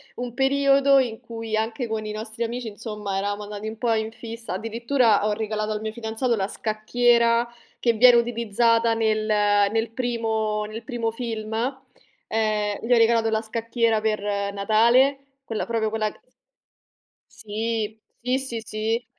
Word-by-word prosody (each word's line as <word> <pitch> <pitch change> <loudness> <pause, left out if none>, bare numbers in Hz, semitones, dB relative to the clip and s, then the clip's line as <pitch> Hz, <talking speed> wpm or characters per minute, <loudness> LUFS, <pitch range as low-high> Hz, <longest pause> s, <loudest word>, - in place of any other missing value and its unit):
un 245 -1 -5
periodo 275 0 +4
in 235 -4 -1
cui 225 -1 -5
anche 225 +3 -2
con 220 -1 -3
i 215 - -4
nostri 220 +2 -5
amici 235 +1 -4
insomma 210 -2 -5
eravamo 205 +1 -2
andati 210 +1 -6
un 220 - -6
po' 235 -1 +1
in 220 0 -1
fissa. 230 -3 -7
Addirittura 225 +1 +1
ho 215 - +1
regalato 215 0 -2
al 210 0 -3
mio 220 - -3
fidanzato 230 +2 -1
la 195 -2 -1
scacchiera 235 +2 +2 0.3
che 235 - +2
viene 240 +2 +7
utilizzata 230 0 +2
nel 220 -1 +1
nel 210 +1 +2
primo 220 -3 -1
nel 215 +2 -7
primo 230 -1 -2
film. 225 -2 -5 0.7
Ehm, 215 -2 0
gli 245 - +3
ho - - +5
regalato 230 0 +4
la 220 - +1
scacchiera 230 0 0
per 215 -1 -1 0.3
Natale, 235 +7 +4 0.3
quella 225 -5 -3
proprio 225 -2 0
quella 215 -1 -1
c - - -21 1.2
Sì, 220 0 -3 0.2
sì, 250 +2 +1
sì, 240 -4 -5
sì. 225 +2 -2
225 Hz, 155 wpm, -24 LUFS, 215-235 Hz, 1.2 s, viene